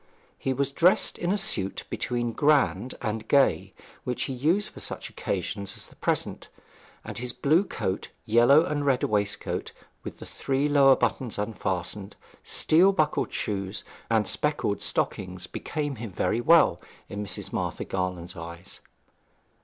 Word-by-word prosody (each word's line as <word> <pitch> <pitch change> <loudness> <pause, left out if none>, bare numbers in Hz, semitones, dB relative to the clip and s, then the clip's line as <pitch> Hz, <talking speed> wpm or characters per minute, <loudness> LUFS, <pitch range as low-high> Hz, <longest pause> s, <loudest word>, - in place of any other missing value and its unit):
He 135 - -1
was 140 +1 0
dressed 175 +6 +3
in 175 - 0
a 205 - +2
suit 195 - -1
between 120 -1 -2
grand 145 -3 +2
and 110 0 -3
gay, 140 -2 +3 0.3
which 125 -1 -2
he 135 - -3
used 160 +11 +1
for - - -11
such - - -4
occasions 100 +2 -3
as - - -6
the - - -16
present, - - -1 0.6
and - - -6
his 125 0 -3
blue 150 +8 +3
coat, 95 - -3 0.2
yellow 120 +8 +6
and 145 -3 -1
red 135 -3 +2
waistcoat 105 -1 -1 0.3
with - - -7
the - - -9
three 135 +1 -1
lower 140 -2 +6
buttons 125 -4 -1
unfastened, 100 -1 -3 0.3
steel 180 +5 +4
buckled 155 -6 0
shoes 100 -1 -3 0.3
and 110 -2 +2
speckled 150 -9 0
stockings, 90 -1 -2
became 145 +3 -4
him 110 -2 -6
very 110 +5 0
well 165 +4 +5 0.3
in 100 +1 -5
Mrs. 95 -3 -2
Martha - - -2
Garland's 90 -2 -3
eyes. 85 +3 -9
120 Hz, 145 wpm, -27 LUFS, 100-145 Hz, 0.6 s, yellow